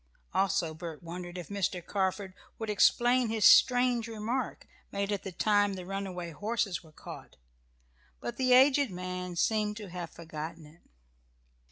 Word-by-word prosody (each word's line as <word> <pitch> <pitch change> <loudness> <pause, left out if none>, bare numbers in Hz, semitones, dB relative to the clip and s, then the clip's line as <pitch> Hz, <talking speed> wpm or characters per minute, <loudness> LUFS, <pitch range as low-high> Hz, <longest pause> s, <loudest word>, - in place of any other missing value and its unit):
Also 175 -4 +1
Bert 165 0 -8
wondered 175 +1 -7
if 175 - -7
Mr. 190 -3 -2
Carford 190 -1 -1 0.2
would 220 -1 -3
explain 240 +3 +4
his 220 -1 +1
strange 245 -2 +6
remark, 230 +3 -3 0.3
made 200 +1 -2
at 205 - -1
the 195 - -6
time 205 +1 +2
the 185 -1 -7
runaway 185 -3 -4
horses 205 +1 -2
were 160 - -17
caught. - - -11 0.8
But 120 - -5
the 255 -1 +1
aged 270 +1 +6
man 180 -1 -5
seemed 210 +3 +1
to 210 -3 -8
have 175 -2 -5
forgotten 160 0 -7
it. 155 +3 -18
195 Hz, 150 wpm, -30 LUFS, 175-220 Hz, 0.8 s, strange